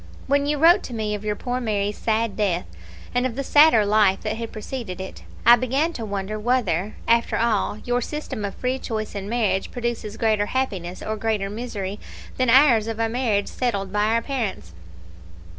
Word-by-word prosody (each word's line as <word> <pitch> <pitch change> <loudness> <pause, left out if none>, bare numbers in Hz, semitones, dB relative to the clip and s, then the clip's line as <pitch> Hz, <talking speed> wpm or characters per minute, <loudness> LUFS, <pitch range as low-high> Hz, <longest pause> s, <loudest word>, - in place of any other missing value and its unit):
When 285 +1 +1
you 295 0 +1
wrote 340 +6 +6
to 245 - -6
me 215 -1 -2
of 205 0 -4
your 210 -1 -1
poor 250 +3 -3
Mary's 205 -3 -1
sad 225 -1 0
death, 190 -5 0 0.5
and 245 - +1
of 235 - -7
the 275 - -2
sadder 290 -7 +6
life 205 -2 +3
that 215 0 -2
had 230 -1 -5
preceded 215 -3 -6
it, 190 - -7 0.2
I 240 - +9
began 270 +7 0
to 235 - -5
wonder 205 0 -4
whether, 215 -5 0
after 235 0 +2
all, 225 -3 +1
your 245 0 +1
system 300 -5 -5
of 200 - -4
free 255 +1 -2
choice 215 -4 -4
in 200 0 -5
marriage 210 -5 0
produces 235 -3 -4
greater 215 -2 +1
happiness 190 -9 -3
or 215 0 -3
greater 210 -3 -1
misery 210 -3 -5 0.4
than 255 -1 +2
ours 240 -4 +6
of 225 -1 -3
a 225 0 +1
marriage 225 -4 0
settled 200 -6 -2
by 210 0 +2
our 230 +1 +1
parents. 225 - -4
220 Hz, 190 wpm, -23 LUFS, 205-245 Hz, 0.5 s, I